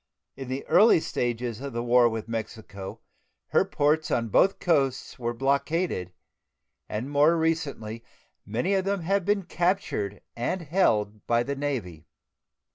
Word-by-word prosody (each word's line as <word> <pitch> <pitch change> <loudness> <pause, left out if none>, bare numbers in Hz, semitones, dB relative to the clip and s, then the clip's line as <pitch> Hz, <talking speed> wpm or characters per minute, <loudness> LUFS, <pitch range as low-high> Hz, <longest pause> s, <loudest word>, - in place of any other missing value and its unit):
In 135 - -7
the 130 +2 -4
early 220 -4 +6
stages 120 -4 -2
of 140 -2 -5
the 120 0 -2
war 120 0 +5
with 110 -1 -5
Mexico 110 -4 -6 0.5
her - - +4
ports 150 +2 +1
on 115 -1 0
both 195 - +4
coasts 140 -10 0
were 120 -1 -1
blockaded, 140 - 0 0.8
and 110 +5 -3
more 150 +4 +4
recently 140 -9 -2 0.4
many 120 - -1
of 190 -1 +2
them 195 -1 -1
have 195 +2 0
been 205 -1 +1
captured 175 - -1
and 170 +10 -2
held 110 - +1
by 120 0 +3
the 140 +2 -3
Navy. 110 - -4
130 Hz, 140 wpm, -26 LUFS, 115-165 Hz, 0.8 s, early